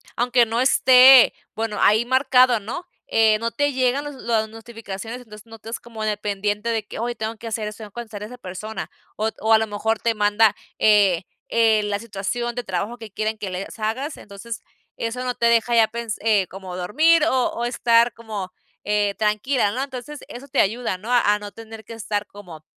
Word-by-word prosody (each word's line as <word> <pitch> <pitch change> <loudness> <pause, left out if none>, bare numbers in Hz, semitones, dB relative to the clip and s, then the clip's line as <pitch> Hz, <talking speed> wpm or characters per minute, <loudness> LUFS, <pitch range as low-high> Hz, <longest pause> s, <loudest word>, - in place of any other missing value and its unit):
aunque 245 0 +3
no 230 +2 -1
esté, 260 0 +7 0.2
bueno, 220 -1 -3
ahí 220 +3 +4
marcado, 255 -2 +4
¿no?, 245 - -6 0.2
eh, 220 -1 +4
no 230 +1 -2
te 290 +1 0
llegan 260 +2 +1
las 290 -1 -7
las 225 -3 -1
notificaciones, 225 0 -8
entonces 210 -3 -13
no 225 0 -12
estás 225 +2 -7
como 225 -2 -8
dependiente 210 +1 -2
de 220 -2 -2
que: - - -8
"Ay, 240 +2 -2
tengo 220 0 -4
que 230 +1 -9
hacer 220 -1 -3
eso, 210 +1 -8
tengo 215 -2 -9
que - - -57
contestar 220 -4 -7
a - - -4
esa 250 +2 -11
persona", 215 +1 -7 0.3
o 220 +1 0
o 220 - +1
a 220 - +8
lo 220 0 -1
mejor 220 +1 -1
te 230 -1 0
manda, 210 0 +3 0.2
eh, 200 -5 +4 0.3
eh, 225 -2 +3
la 205 -1 -2
situación 230 +3 -4
de 245 - -3
trabajo 200 +4 -3
que 225 -3 -10
quieren 215 +2 -2
que 205 -2 -5
les 185 +4 -6
hagas, 230 +8 -3
entonces 210 +3 -9 0.3
eso 230 +2 -4
no 250 - -1
te 235 - +2
deja 235 0 +3
ya 225 -1 +5
pens 230 -1 -4
eh, 210 -4 +2
como 185 0 -8
dormir 305 - +3
o 260 -6 +2
o 235 - -4
estar 235 -1 +3
como, 210 -5 -7 0.3
eh, 205 -1 +1
tranquila, 215 +2 +1
¿no? 260 +3 -2
Entonces 275 +2 -7
eso 255 +3 -9
te 280 - +2
ayuda, 225 -1 -1
¿no?, 215 +6 -7
a 210 -4 +4
no 205 0 -8
tener 225 0 -11
que 220 - -14
estar 210 -2 -3
como 180 -7 -12
225 Hz, 205 wpm, -22 LUFS, 210-240 Hz, 0.3 s, a